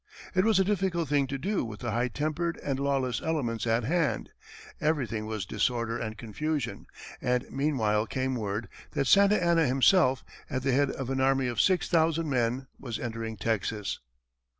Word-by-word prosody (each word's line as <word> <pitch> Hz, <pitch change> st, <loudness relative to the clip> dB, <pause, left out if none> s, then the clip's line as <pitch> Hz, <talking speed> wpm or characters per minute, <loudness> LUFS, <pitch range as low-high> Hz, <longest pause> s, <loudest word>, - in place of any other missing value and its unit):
It 185 Hz, +1 st, +3 dB
was 220 Hz, -3 st, +4 dB
a -, -, +5 dB
difficult 190 Hz, -4 st, 0 dB
thing 145 Hz, -2 st, +2 dB
to 135 Hz, +1 st, -3 dB
do 195 Hz, +8 st, -1 dB
with 105 Hz, -3 st, -7 dB
the 120 Hz, -, -2 dB
high 120 Hz, +3 st, +1 dB
tempered 155 Hz, +7 st, -2 dB
and 135 Hz, -2 st, -1 dB
lawless 135 Hz, -3 st, 0 dB
elements 120 Hz, -9 st, -1 dB
at 115 Hz, +1 st, +2 dB
hand; 165 Hz, +8 st, 0 dB, 0.5 s
everything 130 Hz, -, -1 dB
was 110 Hz, -4 st, -3 dB
disorder 115 Hz, +3 st, 0 dB
and 110 Hz, -1 st, -4 dB
confusion, 115 Hz, 0 st, -3 dB, 0.3 s
and 125 Hz, 0 st, +1 dB
meanwhile 115 Hz, -7 st, +1 dB
came 130 Hz, +2 st, -1 dB
word 105 Hz, -2 st, -3 dB, 0.3 s
that 140 Hz, -, 0 dB
Santa 200 Hz, +7 st, +6 dB
Anna 170 Hz, -3 st, +3 dB
himself, 130 Hz, +1 st, +4 dB, 0.2 s
at 130 Hz, 0 st, -2 dB
the 135 Hz, -, +2 dB
head 140 Hz, +2 st, +3 dB
of 135 Hz, -1 st, -4 dB
an 135 Hz, 0 st, 0 dB
army 135 Hz, 0 st, +3 dB
of 120 Hz, -1 st, +1 dB
six 185 Hz, -2 st, +2 dB
thousand 165 Hz, -2 st, +2 dB
men, 125 Hz, +1 st, 0 dB
was 120 Hz, -4 st, -4 dB
entering 115 Hz, -1 st, -4 dB
Texas. 105 Hz, -2 st, -2 dB
130 Hz, 175 wpm, -28 LUFS, 115-155 Hz, 0.5 s, Santa